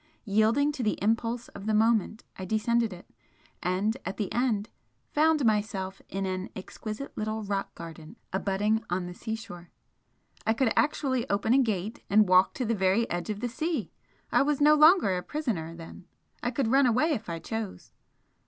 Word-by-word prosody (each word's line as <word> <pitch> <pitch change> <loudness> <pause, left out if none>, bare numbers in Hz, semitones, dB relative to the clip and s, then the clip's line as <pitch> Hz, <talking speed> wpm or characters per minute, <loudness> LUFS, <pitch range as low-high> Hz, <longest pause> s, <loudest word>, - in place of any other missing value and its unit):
Yielding 220 +8 +3
to 285 -3 -5
the 215 -3 0
impulse 230 +3 0
of 200 - -9
the 215 - +2
moment, 220 0 +2
I 190 - -7
descended 220 +3 +1
it, 180 -1 -11 0.5
and 190 +5 0
at - - -5
the 205 -4 -3
end 230 -4 0 0.4
found 310 -2 +3
myself 205 -3 0
in 195 0 -2
an 185 0 -3
exquisite 215 +6 -7
little 215 0 -3
rock 200 -1 -3
garden 165 +2 -10 0.2
abutting 205 +3 0
on 180 +1 -1
the 175 - -6
seashore. 200 -5 -7 0.7
I 220 - +2
could 230 -1 +1
actually 270 -4 +1
open 205 +3 +2
a 270 - +5
gate, 215 -2 -2
and 210 0 +5
walk 185 +1 +5
to 255 - -2
the 230 - +1
very 195 +3 +2
edge 175 +4 -3
of 210 0 -3
the 245 - 0
sea. 310 - -2 0.4
I - - +4
was 290 0 +1
no 300 +1 +6
longer 305 - +6
a 180 - -2
prisoner, 180 - -3
then! 170 +2 -11 0.3
I 245 - 0
could 245 -1 -1
run 270 0 +5
away 255 +8 +2
if 225 - -3
I 165 - -3
chose! 215 +4 -6
220 Hz, 180 wpm, -28 LUFS, 190-245 Hz, 0.7 s, no